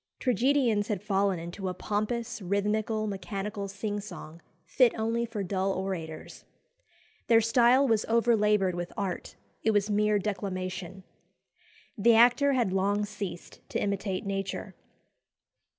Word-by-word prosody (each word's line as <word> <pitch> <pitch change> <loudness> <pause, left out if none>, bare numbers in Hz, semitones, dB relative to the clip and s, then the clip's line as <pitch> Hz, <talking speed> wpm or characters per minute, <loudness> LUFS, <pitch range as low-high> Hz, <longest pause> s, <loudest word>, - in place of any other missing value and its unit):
Tragedians 245 -3 +2
had 205 -4 -3
fallen 195 -2 +1
into 175 +3 -5
a 180 - -5
pompous 220 +4 -2
"rhythmical, 210 +3 0
mechanical 200 +1 -4
sing 205 +1 -4
song," 175 -5 -10 0.2
fit 250 -3 +3
only 230 +1 -1
for 220 -3 -4
dull 190 +1 -1
orators. 180 -5 -5 0.8
Their 230 -1 +6
style 240 +4 +4
was 225 -3 +2
overlaboured 210 -4 +3
with 175 0 -4
art 195 -3 -4 0.3
it - - +1
was 210 -1 +2
mere 210 0 +3
declamation. 190 -2 -4 0.9
The 225 +2 +4
actor 245 +5 +5
had 235 -8 +1
long 200 +2 +1
ceased 200 -4 -7
to - - -2
imitate 200 -1 -2
nature. 195 -1 -4
205 Hz, 125 wpm, -28 LUFS, 190-225 Hz, 0.9 s, Their